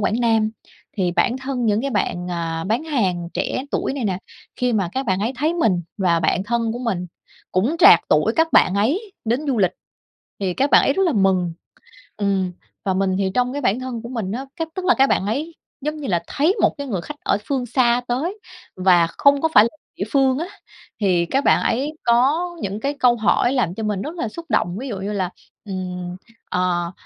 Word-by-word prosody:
Quảng 215 +4 0
Nam. 225 -2 +2 0.5
Thì 180 -3 +1
bản 235 +8 +1
thân 260 -3 -2
những 210 +1 +2
cái 275 +1 -2
bạn, 180 -4 -1
à, 165 -1 -3
bán 230 +10 -1
hàng 185 - -1
trẻ 260 - -2
tuổi - - -1
này 270 -5 -3
nè, 190 -3 -1 0.4
khi 250 -1 0
mà 195 -5 +1
các 265 -1 -2
bạn 190 0 +1
ấy 230 +5 -1
thấy 310 +5 0
mình 195 - +1 0.2
và 170 -3 +2
bạn 180 +3 +1
thân 230 0 0
của 240 - -5
mình 195 -8 -2 0.5
cũng 225 - +1
trạc - - +8
tuổi - - +3
các 325 0 +2
bạn 185 - +5
ấy 335 - 0
đến 235 +5 +1
du 255 -5 0
lịch 185 -2 +3 0.7
thì 185 -2 -1
các 275 +1 +1
bạn - - +7
ấy 275 - +3
rất 385 - 0
là 330 - +2
mừng, 190 -4 +2 0.7
ừm. 195 -3 0 0.3
Và 190 - +1
mình 190 0 +1
thì 190 -1 0
trong 250 +1 +1
cái 285 - -3
bản 230 +1 +1
thân 255 -3 -5
của 235 - -7
mình 220 -6 -3
á, 260 +4 -4
cách 325 -1 -3
tức 375 -1 -4
là 365 - +5
các 270 +1 +4
bạn 190 - +1
ấy 290 +10 -3 0.3
giống 300 +2 -3
như 285 -3 -5
là 170 -3 0
thấy 325 +9 +1
một - - +3
cái 285 -1 -5
người 195 -7 -2
khách 295 +10 -8
ở - - +2
phương 265 -3 -1
xa 245 0 +2
tới 320 - -2 0.4
và 180 -2 +4
không 280 +10 +3
có 320 - +2
phải 210 - +9
là 230 - +1 0.3
địa 195 - -2
phương 270 -2 +3
á, 335 +3 -3 0.5
thì 180 -4 +2
các 270 +10 0
bạn - - +4
ấy 280 +6 0
có 275 +9 +3
những 200 +2 -3
cái 280 +5 -1
câu 245 -1 +5
hỏi 235 +3 +2
làm 200 -10 0
cho 220 - -4
mình 210 -2 -1
rất 310 - -5
là 280 - -2
xúc 335 +8 -9
động. 180 -5 0
Ví 270 - -5
dụ 210 -5 -4
như 200 +2 -3
là, 185 -3 -1 0.4
ừm, 180 -2 -5 0.3
ờ, 175 -1 0
225 Hz, 225 wpm, -21 LUFS, 190-275 Hz, 0.7 s, phải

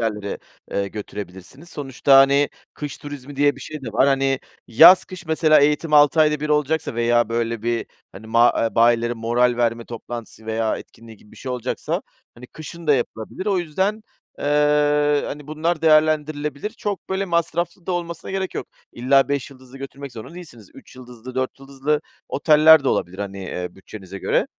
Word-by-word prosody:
yerlere, 105 -3 -3 0.3
eee, 100 0 -1
götürebilirsiniz. 100 - -9
Sonuçta, 140 -2 +2
hani, 140 +1 +4 0.3
kış 150 +2 -6
turizmi 145 -1 -9
diye 145 -1 +2
bir 135 - -12
şey 155 0 -8
de 115 - -6
var. 130 - +3
Hani, 135 -1 +1 0.3
yaz 165 +10 +8
kış 185 -1 -11
mesela 155 -1 +4
eğitim 150 +2 +1
6 150 +1 +5
ayda 150 -1 +3
1 150 - -3
olacaksa 150 -2 0
veya 120 0 +2
böyle 115 -1 -2
bir, 120 0 -1 0.3
hani, 105 +3 -11
ma 115 +2 +4 0.2
bayileri 120 0 +3
moral 120 +2 +1
verme 115 -1 0
toplantısı 115 -1 -9
veya 110 0 -1
etkinliği 115 -1 -13
gibi 105 - -22
bir - - -16
şey 130 - -5
olacaksa, 125 -2 -3 0.3
hani, 125 +1 -12
kışın 165 +3 -10
da 145 - +5
yapılabilir. 120 - -4
O 195 -3 +2
yüzden, 190 +6 -1 0.4
eee, 150 0 +2
hani, 145 0 -7
bunlar 155 +2 -2
değerlendirilebilir. 155 +2 +1
Çok, 205 -4 -5
böyle, 190 +1 -1
masraflı 170 0 -2
da 185 - -1
olmasına 170 -2 -5
gerek 190 -1 -3
yok. - - -4 0.3
İlla 135 +3 +3
5 140 -1 -2
yıldızlı 130 0 -15
götürmek 135 0 -8
zorunda 115 +9 -10
değilsiniz. 120 - -12
3 - - -15
yıldızlı 125 0 -11
4 130 +1 -2
yıldızlı 140 +2 -2 0.3
oteller 155 0 +5
de - - +2
olabilir, 90 +2 -2
hani, 100 -1 -5
eee, 90 -1 -5
bütçenize 95 0 -10
göre - - 0
140 Hz, 170 wpm, -21 LUFS, 115-155 Hz, 0.4 s, yaz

